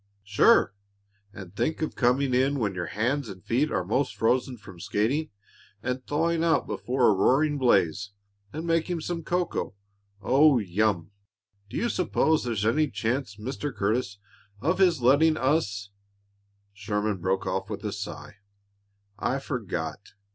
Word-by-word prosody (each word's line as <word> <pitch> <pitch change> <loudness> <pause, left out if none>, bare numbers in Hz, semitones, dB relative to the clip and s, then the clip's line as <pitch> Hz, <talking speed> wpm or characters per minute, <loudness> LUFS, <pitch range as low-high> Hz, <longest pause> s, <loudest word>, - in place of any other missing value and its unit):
"Sure! 100 -1 +4 0.6
And 95 -2 -11
think 160 +6 -1
of 155 - -2
coming 130 +2 +2
in 135 +3 +2
when 105 -6 -1
your 90 -1 -4
hands 125 +4 -1
and 95 -2 -10
feet 140 +6 +1
are 95 -2 -1
'most 110 +2 0
frozen 125 +4 +1
from 95 -5 -13
skating, 125 - -1 0.5
and 130 +1 -2
thawing 165 +2 +1
out 165 -1 +2
before 125 0 0
a - - +5
roaring 145 +9 +2
blaze, 100 -5 +2 0.4
and 160 +3 -5
making 165 0 0
some 170 +1 -3
cocoa, 175 - -2 0.4
oh, 140 +5 +4
yum! 100 -3 0 0.6
Do - - -5
you 240 - 0
s'pose 160 - +1
there's 110 -4 -1
any 150 +6 +2
chance, 110 +2 -2
Mr. 130 +7 -4
Curtis, 105 -1 -1 0.4
of 165 - 0
his 170 -9 +3
letting 155 +5 +5
us 105 -9 0 0.4
" 100 0 -43 0.3
Sherman 105 0 -2
broke 95 +2 0
off 95 0 -2
with - - -6
a - - -1
sigh. - - -7 0.8
"I 135 - 0
forgot. 100 - -4
125 Hz, 145 wpm, -26 LUFS, 100-150 Hz, 0.8 s, a